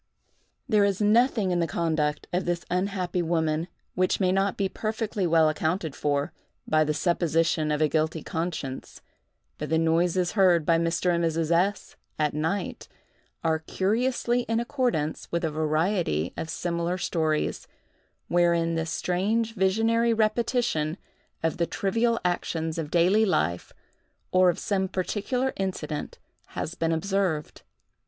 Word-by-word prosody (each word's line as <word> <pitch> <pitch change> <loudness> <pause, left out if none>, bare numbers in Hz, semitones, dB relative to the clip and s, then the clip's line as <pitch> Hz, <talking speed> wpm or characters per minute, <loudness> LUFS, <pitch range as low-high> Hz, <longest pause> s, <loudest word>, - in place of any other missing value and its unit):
There 215 -5 +4
is 200 -2 +1
nothing 215 -2 +3
in 175 - +1
the 170 - +1
conduct 155 -3 -1
of 180 +1 0
this 175 -1 -2
unhappy 180 -1 -1
woman 160 -1 0 0.3
which 185 0 +1
may 185 -2 +2
not 195 +1 +1
be 195 - +1
perfectly 215 -2 -2
well 165 -1 +4
accounted 160 0 -1
for, 145 +2 -1 0.3
by 155 0 +3
the 150 - 0
supposition 165 -2 +1
of 150 +1 +1
a - - +4
guilty 155 +1 -1
conscience; 160 -5 -5 0.6
but - - -4
the 160 - +2
noises 170 +2 +2
heard 180 -6 +4
by 165 +1 +3
Mr. 170 +2 +1
and 170 0 0
Mrs. 165 0 0
S—— 185 +4 0 0.2
at 150 -1 +1
night, 160 +7 -2 0.6
are 160 -1 +1
curiously 240 +8 0
in 225 0 +2
accordance 235 - -1
with 170 0 0
a 160 - -1
variety 155 - 0
of 160 - -5
similar 170 +1 -2
stories, 160 -4 -1 0.6
wherein 170 -1 +2
this 165 0 -2
strange 215 +7 0
visionary 225 +4 +2
repetition 215 -7 0 0.5
of 165 -1 0
the 170 - 0
trivial 230 +4 0
actions 165 -2 -1
of 155 -2 -4
daily 180 +6 +4
life, 90 - 0 0.6
or 185 0 +5
of 175 - 0
some 190 -2 -1
particular 225 +8 -1
incident, 170 -6 -4 0.3
has 165 - -5
been 165 0 -1
observed. 180 -2 -1
175 Hz, 140 wpm, -26 LUFS, 160-200 Hz, 0.6 s, or